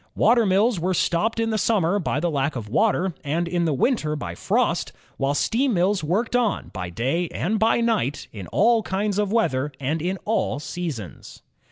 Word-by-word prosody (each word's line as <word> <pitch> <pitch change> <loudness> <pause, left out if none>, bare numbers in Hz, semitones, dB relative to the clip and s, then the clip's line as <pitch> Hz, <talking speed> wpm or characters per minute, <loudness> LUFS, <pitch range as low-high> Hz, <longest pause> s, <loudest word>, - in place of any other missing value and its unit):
Water 230 -1 +4
mills 200 +2 +2
were 180 +2 0
stopped 215 +8 +1
in 225 0 0
the 215 - 0
sunmier 200 -3 +2
by 150 - 0
the 170 +2 0
lack 140 0 -1
of 115 -4 -5
water, 190 - +1
and 165 +4 -1
in 175 0 0
the 160 - +1
winter 155 - +1
by 85 - -5
frost, - - 0 0.3
while 140 +1 0
steam 240 - +1
mills 185 +1 +1
worked 205 +10 0
on, 235 -5 0
by 90 - -4
day 135 - -1
and 210 +7 -2
by 225 +2 +3
night, 220 - 0
in 100 -5 -7
all 225 - +3
kinds 200 0 -1
of 205 -1 0
weather, 150 - +1
and 150 +4 -1
in 185 +3 -1
all 210 - 0
seasons. 150 - -6
180 Hz, 190 wpm, -23 LUFS, 150-220 Hz, 0.3 s, Water